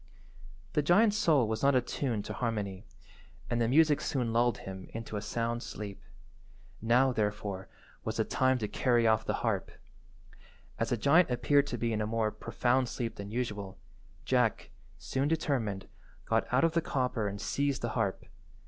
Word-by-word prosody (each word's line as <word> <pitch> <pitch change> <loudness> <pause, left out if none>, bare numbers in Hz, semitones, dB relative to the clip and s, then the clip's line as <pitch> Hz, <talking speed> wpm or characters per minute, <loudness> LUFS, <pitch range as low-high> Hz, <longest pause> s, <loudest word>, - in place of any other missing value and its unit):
The 150 - +3
giant's 205 +8 +4
soul 160 - +3
was 110 0 -2
not 140 0 +4
attuned 120 -3 -1
to - - -5
harmony, 105 -6 -3 0.6
and 120 0 +1
the 115 - +2
music 150 +3 +4
soon 120 -5 -1
lulled 120 -1 +2
him 95 -1 -8
into 115 -1 -5
a 105 - -2
sound 115 +2 -2
sleep. 105 -4 -7 0.8
Now, 125 +4 +4
therefore, 105 -3 -2 0.3
was - - -3
the - - +3
time 130 0 +2
to 110 -3 -2
carry 120 +1 +2
off 110 -1 +3
the - - 0
harp. - - 0 1.1
As - - 0
the 120 - +1
giant 155 +8 +4
appeared 140 +3 +3
to - - -3
be 115 -1 -1
in 110 - -1
a 105 - -1
more 110 -1 0
profound 125 +2 0
sleep 115 -2 -4
than 100 0 -6
usual, 105 -5 -4 0.5
Jack, 125 -4 +1 0.3
soon 135 +2 -1
determined, 130 -11 -1 0.4
got - - 0
out - - +3
of 165 - +4
the 170 +1 +1
copper 125 -7 -1
and 100 0 -5
seized 140 +3 -1
the 120 - 0
harp. 110 -4 -1
120 Hz, 170 wpm, -31 LUFS, 105-135 Hz, 1.1 s, giant's